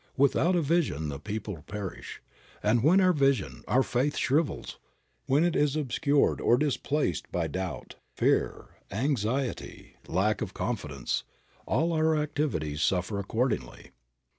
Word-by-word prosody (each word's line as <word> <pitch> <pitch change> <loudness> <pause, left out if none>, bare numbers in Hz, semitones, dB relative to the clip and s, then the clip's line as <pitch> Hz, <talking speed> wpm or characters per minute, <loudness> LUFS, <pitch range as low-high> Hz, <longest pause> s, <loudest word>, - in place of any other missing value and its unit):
"Without 140 +6 +3
a 170 - +2
vision 140 - 0
the 70 -1 -5
people 105 -3 -5
perish," 100 -2 -7 0.4
and 110 +3 +3
when 165 +9 +5
our 185 -1 +5
vision, 135 - +1
our 130 +2 +3
faith, 130 +5 0
shrivels, 145 +3 0 0.5
when 145 +4 +3
it 175 -1 +1
is 150 -1 +2
obscured 145 0 +1
or 120 - +4
displaced 140 - -1
by 85 -2 0
doubt, 90 +4 -5 0.2
fear, - - +1 0.2
anxiety, 125 +2 -2
lack 100 +4 +1
of - - -4
confidence, 70 -5 -2 0.4
all 170 +1 +1
our 160 0 +2
activities 140 - -1
suffer 95 +4 0
accordingly. 110 - -2
130 Hz, 130 wpm, -28 LUFS, 95-150 Hz, 0.5 s, when